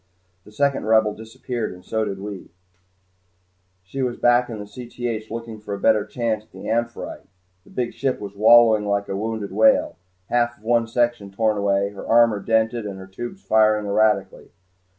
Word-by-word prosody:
The 105 - -15
second 140 +3 0
Rebel 110 -1 +4
disappeared 115 +2 -5
and 90 0 -14
we - - -21 0.2
did 95 - -5
too. 100 -1 -8 1.3
She 135 +9 -6
was 125 -2 -1
back 120 0 +3
in 115 - -5
Cth 115 0 -6
looking 115 -1 -6
for 105 -1 -5
a - - -8
better 110 -1 +3
chance 110 -2 -2
at - - -32
the - - -9
"Amphitrite." 115 +1 -3 0.4
The - - -19
big 125 -2 -3
ship 130 +2 -1
was 100 -1 -8
wallowing 110 0 +6
like 100 0 0
a 95 - -2
wounded 110 0 -3
whale, 275 -1 +3 0.3
half 120 -1 +1
of 105 - -26
one 115 0 +2
section 120 -3 0
torn 110 +2 0
away, 100 0 +1
her 100 - -9
armor 115 -2 +4
dented, 110 +1 0
and 100 -1 -6
her 95 - -9
tubes 120 - -8
firing 110 -1 +3
erratically. 100 -2 +1
110 Hz, 175 wpm, -22 LUFS, 105-120 Hz, 1.3 s, wallowing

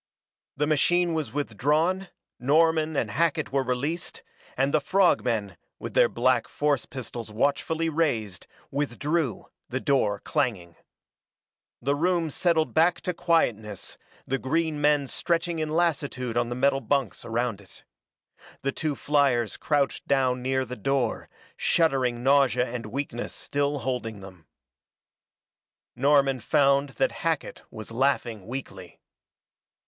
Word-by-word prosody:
The 150 - +2
machine 170 +3 +2
was 155 -8 -2
withdrawn, 150 - 0 0.3
Norman 160 +3 +3
and 110 -6 -1
Hackett 160 +2 0
were 135 0 +2
released, 140 +6 -3 0.3
and 135 +2 +1
the 155 - +3
frog 190 +5 +3
men, 105 -7 -2 0.2
with - - -7
their - - +5
black 125 +1 +2
force 145 -4 0
pistols 120 -4 -7
watchfully 150 +8 0
raised, 140 - -1 0.2
withdrew, 145 - -1 0.2
the 130 - -2
door 120 -8 +1
clanging. 90 -8 -1 1.1
The 140 +3 +2
room 170 0 +1
settled 160 0 +1
back 165 +2 +3
to 180 - -2
quietness, 120 - -1 0.3
the 135 +1 -1
green 155 +2 -1
men 145 -1 +3
stretching 170 +4 -1
in 155 -1 -1
lassitude 145 -7 -1
on 120 0 +1
the 120 - -3
metal 135 +1 +2
bunks 140 -5 -1
around 115 -2 -2
it. 95 - -15 0.8
The 140 - 0
two 150 +1 -2
fliers 135 -7 +1
crouched 145 -3 -1
down 130 -2 +2
near 130 +1 0
the 125 +1 -6
door, 125 +1 -1 0.3
shuddering 130 -7 +1
nausea 135 -2 +4
and 120 -2 -5
weakness 120 0 -4
still 145 0 -1
holding 120 -5 -3
them. 90 -5 -13 1.5
Norman 135 0 +3
found 140 +3 +3
that 135 - +2
Hackett 165 -3 -2
was 110 0 -9
laughing 120 -5 0
weakly. 100 -8 -7
135 Hz, 130 wpm, -26 LUFS, 120-155 Hz, 1.5 s, their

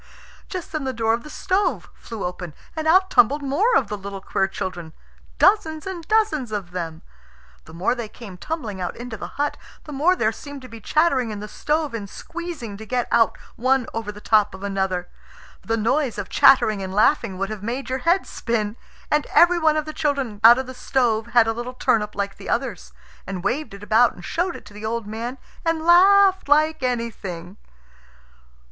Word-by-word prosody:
Just 365 -3 -6
then 310 -3 -3
the 265 -1 -2
door 225 -1 +1
of 230 - -1
the 300 - -11
stove 380 +5 -1
flew 225 -5 -7
open, 180 -3 -6 0.2
and 315 0 -2
out 375 +3 +4
tumbled 295 -7 +4
more 380 - +2
of 250 - +3
the 210 - -4
little 195 0 -6
queer 195 0 0
children, 175 -4 -6 0.4
dozens 325 -6 +3
and 360 -4 -6
dozens 420 - +1
of 200 -4 -4
them. 165 -3 -5 0.6
The 160 - -13
more 185 +8 +1
they 240 -3 -5
came 210 -6 -11
tumbling 215 - -5
out 180 - -3
into 240 -1 -6
the 205 - -9
hut, 290 +1 -1 0.3
the 300 - -9
more 320 +7 +3
there 220 -10 +1
seemed 285 +3 -10
to - - -9
be 230 -2 -11
chattering 275 -3 +2
in 210 -1 -5
the 210 - -6
stove 300 +4 -1
and 205 -4 -5
squeezing 325 - -7
to 220 - -9
get 245 0 -1
out 230 -2 +3 0.2
one 255 +1 +2
over 225 -2 -3
the 210 - -12
top 210 -2 +2
of 190 - -11
another. 190 -3 -1 0.5
The 225 0 -1
noise 245 +3 0
of 205 - -5
chattering 215 -6 +5
and 190 -1 -5
laughing 210 -3 +2
would 195 +2 -2
have 215 -2 -6
made 240 +6 -4
your 260 +1 -2
head 345 +7 +2
spin. 220 -2 -2 0.3
And 300 0 +2
every 345 0 +5
one 315 -1 +3
of 305 - -1
the 310 - -6
children 275 -10 -2
out 235 +2 +9
of 260 - -2
the 260 - -8
stove 240 -3 0
had 240 -1 +5
a 225 - 0
little 240 +2 -6
turnip 210 -4 +1
like 200 -1 -3
the - - -9
others, 235 -5 -2 0.4
and 185 -2 -5
waved 245 -3 -2
it 200 - -12
about 225 +3 +4
and 175 - -11
showed 350 +1 -1
it - - -11
to 205 - -14
the 210 +1 -10
old 225 0 -2
man, 230 +5 -5 0.3
and 330 -1 -1
laughed 380 0 +6
like 310 +1 +3
anything. 210 -7 -4
235 Hz, 205 wpm, -22 LUFS, 205-305 Hz, 0.6 s, out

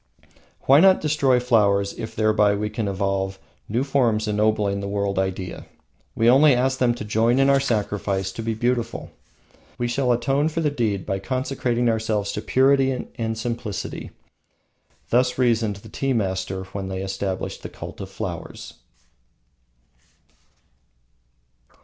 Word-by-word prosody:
Why 135 +2 +6
not 190 +2 +6
destroy 140 -4 +2
flowers 100 -5 +2
if 110 0 -7
thereby 105 -1 +3
we 105 +1 -3
can 110 -2 -2
evolve 95 0 -1 0.3
new 120 +5 0
forms 120 -6 +1
ennobling 105 -1 +1
the 100 - -4
world 100 -1 -1
idea? 95 -2 -4 0.5
We 115 - +2
only 135 +3 +6
ask 130 +2 0
them 120 -2 +2
to 110 - -6
join 115 +4 +2
in 135 0 +4
our 140 - +4
sacrifice 105 -6 -1
to 115 - -6
the 115 0 -2
beautiful. 120 +1 -2 0.7
We 120 - -1
shall 125 +1 +1
atone 135 +5 +1
for 160 - -3
the 150 -2 +1
deed 110 -8 -1
by 95 - -2
consecrating 125 0 -1
ourselves 110 -3 0
to 105 - -4
Purity 135 0 +2
and 115 -1 -3
Simplicity. 115 -2 -4 1.0
Thus 125 +1 +2
reasoned 115 -4 +2
the 100 - -13
tea 135 -1 -1
masters 95 -3 -2
when 95 -1 -4
they 95 0 -4
established 95 -1 -4
the - - -7
Cult - - -9
of - - -7
Flowers. - - -7
110 Hz, 145 wpm, -23 LUFS, 100-125 Hz, 1.0 s, Why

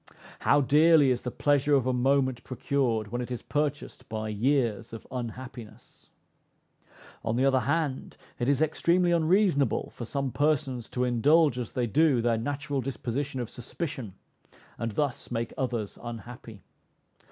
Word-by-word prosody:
How 145 - +4
dearly 150 0 +5
is 125 - 0
the 125 - -3
pleasure 145 +2 +2
of 135 -3 +2
a 130 - +1
moment 130 0 +1
procured 125 -5 -1
when 120 +1 -2
it 125 - -5
is 125 -2 -5
purchased 145 -1 -3
by 110 0 -3
years 115 -1 0
of 115 - -8
unhappiness! 120 -2 -8 1.1
On 110 0 -1
the 130 +3 +2
other 135 -1 +4
hand, 145 0 -2 0.2
it 120 +1 0
is 140 +2 +3
extremely 175 +3 +2
unreasonable 170 - +2
for 120 - -7
some 140 +2 -2
persons 140 -5 0
to 125 - -1
indulge 135 +3 +3
as 120 - -5
they 125 - 0
do, 145 +3 +3
their 115 -1 +1
natural 145 +2 -2
disposition 130 +2 -3
of 120 - -4
suspicion, 125 - -6 0.6
and 115 -2 -3
thus 140 +1 -2
make 115 -1 -3
others 120 -6 -3
unhappy. 115 -2 -9
130 Hz, 150 wpm, -28 LUFS, 120-145 Hz, 1.1 s, dearly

